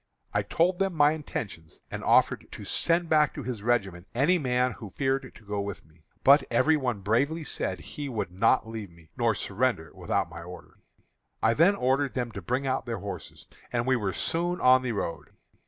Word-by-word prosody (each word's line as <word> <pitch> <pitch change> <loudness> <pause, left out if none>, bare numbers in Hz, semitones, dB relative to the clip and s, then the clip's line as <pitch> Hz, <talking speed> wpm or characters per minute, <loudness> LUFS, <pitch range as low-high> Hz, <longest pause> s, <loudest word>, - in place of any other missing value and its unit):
I 105 - +2
told 170 - +1
them 195 -2 0
my 145 -1 +5
intentions, 105 - -6
and - - -5
offered - - +3
to - - -8
send 170 0 +1
back 155 -2 +3
to 145 - -5
his 120 -3 -4
regiment 100 -6 0
any 160 +9 +3
man 125 -2 +1
who 110 -4 -9
feared 135 +4 -1
to 110 - -16
go 100 0 -2
with 100 -1 -6
me. 80 +1 -25 0.2
But 140 +1 +7
every 140 +7 +4
one 125 -8 -1
bravely 140 - +1
said - - -2
he 145 -1 -6
would 110 -7 -3
not 110 +4 +2
leave 110 -3 -6
me, 85 -2 -20
nor - - +2
surrender - - -1
without - - -1
my 85 -1 -9
order. 90 +1 -11 0.6
I 110 - +5
then 170 - +5
ordered 135 -1 +1
them 120 -2 -2
to 100 - -7
bring 125 +10 -1
out 130 -1 -1
their 115 -1 -2
horses, 100 0 -8 0.3
and 120 -1 0
we 130 0 +3
were 105 -6 -1
soon 175 - -1
on 130 0 +6
the 125 -2 -2
road. 100 -5 -4
125 Hz, 200 wpm, -28 LUFS, 100-145 Hz, 0.6 s, But